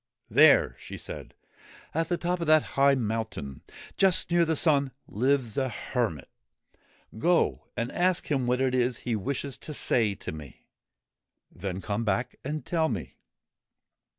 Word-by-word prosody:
There,' - - +6
she - - -8
said, - - -8 0.6
'at 165 +1 -1
the 175 - +1
top 175 +1 -1
of 170 - -3
that 155 -1 +6
high 140 0 +5
mountain, 110 - -3 0.4
just 185 -2 +3
near 170 0 +4
the 160 0 0
sun, 140 -4 +2
lives 130 +1 0
a 130 -1 0
hermit. 115 - -3 0.9
Go 175 +6 +2
and 120 +1 -2
ask 180 0 +1
him 135 -4 0
what 125 +1 +1
it 130 -1 +1
is 125 -1 +1
he 120 - 0
wishes 135 +5 -3
to 150 - -6
say 110 -7 +2
to - - -6
me. 75 -4 -11 0.9
Then 95 0 -5
come 105 +2 -2
back 105 +2 -1
and 150 +3 -4
tell 160 -2 +1
me.' 105 -9 -5
130 Hz, 150 wpm, -28 LUFS, 110-155 Hz, 0.9 s, There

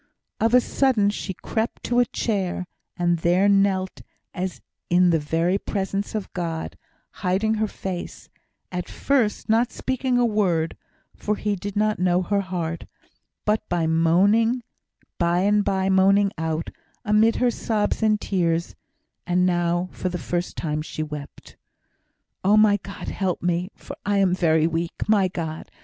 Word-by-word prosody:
Of 225 +2 +3
a 250 - +7
sudden 235 -6 +2
she 205 - -4
crept 220 +5 -3
to 245 0 +1
a 245 - +5
chair, 190 -6 -2 0.3
and 175 -1 +1
there 175 +4 +3
knelt 195 -2 +2 0.3
as 185 0 -4 0.3
in 180 0 +4
the 165 - +3
very 165 +5 0
presence 200 +1 -3
of 210 -3 -4
God, 165 -3 -4 0.5
hiding 195 +4 +1
her 220 - +2
face, 185 -3 -6 0.4
at 180 -1 -4
first 255 -7 0
not 230 +2 +2
speaking 260 -1 -1
a 245 - +4
word 185 -8 +1 0.4
(for 210 - -1
did 205 -3 -3
He 200 0 -3
not 215 -1 +1
know 180 0 +2
her 200 +2 +1
heart), 170 -3 -4 0.6
but 215 +1 +2
by 175 -2 0
and 195 +2 +1
by 190 -1 +1
moaning 195 +1 +4
out, 160 0 -3 0.3
amid 215 +2 +4
her 250 -1 +2
sobs 215 -2 -1
and 215 -1 +3
tears 170 -4 0 0.5
(and 180 0 +2
now 175 0 +1
for 185 - -3
the 180 - -3
first 175 +1 -3
time 150 -2 -2
she 155 0 -4
wept), 150 -2 -9 0.9
"Oh, 205 +3 +5
my 215 -1 +5
God, 200 0 -8
help 185 -4 -2
me, 175 +1 0
for - - -9
I 205 0 +1
am 190 -2 +3
very 160 -3 +3
weak. 165 +1 -2
My 205 -3 +4
God! 160 -3 -5
190 Hz, 150 wpm, -24 LUFS, 175-210 Hz, 0.9 s, a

